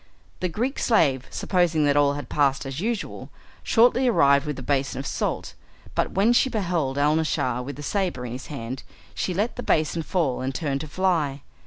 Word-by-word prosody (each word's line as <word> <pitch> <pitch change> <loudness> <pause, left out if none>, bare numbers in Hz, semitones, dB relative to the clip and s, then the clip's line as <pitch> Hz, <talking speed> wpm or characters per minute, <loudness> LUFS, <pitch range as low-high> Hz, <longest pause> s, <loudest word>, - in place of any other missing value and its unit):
The 180 - -1
Greek 240 - -2
slave, 140 - +2
supposing 170 -5 +1
that 145 0 +3
all 145 -1 +4
had 145 0 -6
passed 140 -2 +1
as 135 +2 -5
usual, 225 +2 -3 0.3
shortly 245 +2 +4
arrived 140 - +4
with 150 - -2
the 130 - -8
basin 135 0 0
of 135 - -4
salt, - - -2 0.4
but - - 0
when 210 +5 +4
she 260 +2 +3
beheld 170 - -1
Alnaschar 145 -4 +1
with 140 +3 -6
the 145 - -8
sabre 180 -7 -1
in 120 - -5
his 125 +2 -7
hand 130 -2 -6 0.3
she - - -2
let 205 +6 -1
the - - -3
basin 160 -5 +1
fall 155 -7 -1
and 130 +1 -3
turned 140 -4 -1
to 155 - -6
fly. 150 -5 0
150 Hz, 190 wpm, -24 LUFS, 135-185 Hz, 0.4 s, all